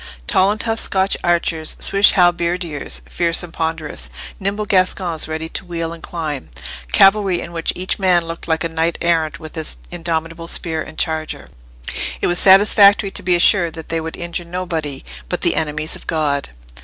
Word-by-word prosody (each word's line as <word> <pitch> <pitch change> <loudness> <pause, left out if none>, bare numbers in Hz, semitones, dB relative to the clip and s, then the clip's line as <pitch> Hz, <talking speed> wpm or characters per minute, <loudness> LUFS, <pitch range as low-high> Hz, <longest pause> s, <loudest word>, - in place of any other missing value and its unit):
Tall 185 - +3
and 210 +1 -1
tough 225 -1 +1
Scotch 190 0 +2
archers, 170 -2 0
Swiss 200 +1 +4
halberdiers 175 - 0
fierce 170 - -1
and 170 -2 -10
ponderous, 160 - -2 0.3
nimble 200 +2 -2
Gascons 185 -4 0
ready 160 0 -4
to - - -5
wheel 165 -2 -4
and 165 - -11
climb, 155 -6 -5 0.4
cavalry 195 - +4
in 170 - -7
which 165 -1 -2
each 185 +3 -3
man 180 -3 +3
looked 165 0 -7
like 160 0 0
a - - 0
knight 165 +1 -1
errant 165 -1 0
with 155 -2 -10
his 160 -1 -3
indomitable 165 -1 -4
spear 160 -2 -2
and 155 - -9
charger—it - - -4
was 175 0 +4
satisfactory 200 +1 +6
to - - -4
be 180 -1 +2
assured 175 -1 +4
that 160 -1 -9
they 165 0 -1
would 160 0 -6
injure 170 0 -4
nobody 170 -5 -4 0.2
but - - -2
the - - +2
enemies 155 0 -2
of - - -13
God! 145 -3 -1
170 Hz, 170 wpm, -18 LUFS, 160-180 Hz, 0.4 s, satisfactory